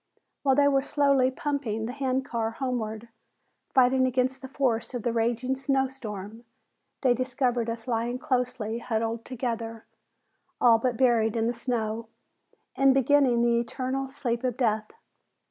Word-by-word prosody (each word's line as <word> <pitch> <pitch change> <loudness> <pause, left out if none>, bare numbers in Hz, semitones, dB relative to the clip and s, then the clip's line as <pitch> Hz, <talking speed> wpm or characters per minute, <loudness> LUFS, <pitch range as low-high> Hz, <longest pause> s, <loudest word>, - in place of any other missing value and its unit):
While 270 -2 +3
they 285 0 +5
were 275 -1 +3
slowly 275 -2 +3
"pumping" 260 -6 -2
the 235 - -4
hand 265 -1 -1
car 230 -2 -1
homeward, 230 -2 -4 0.6
fighting 260 0 +4
against 255 +1 0
the 265 - -7
force 255 -3 -1
of 240 - -4
the 240 - 0
raging 240 +3 0
snow 265 0 +1
storm, 220 -3 -8 0.6
they 255 -3 +4
discovered 245 -1 0
us 230 +1 -5
lying 240 +1 -1
closely 250 -5 -2
cuddled 225 0 -1
together, 230 -3 -4 0.7
all 235 -2 +6
but 245 0 -1
buried 230 -3 +3
in 225 -1 +1
the 235 - 0
snow 230 -2 -2 0.7
and 270 -1 +4
beginning 270 -2 +4
the 235 0 +3
eternal 260 +3 -3
sleep 245 -3 -3
of 250 -2 -1
death. 215 -3 0
245 Hz, 145 wpm, -27 LUFS, 230-265 Hz, 0.7 s, all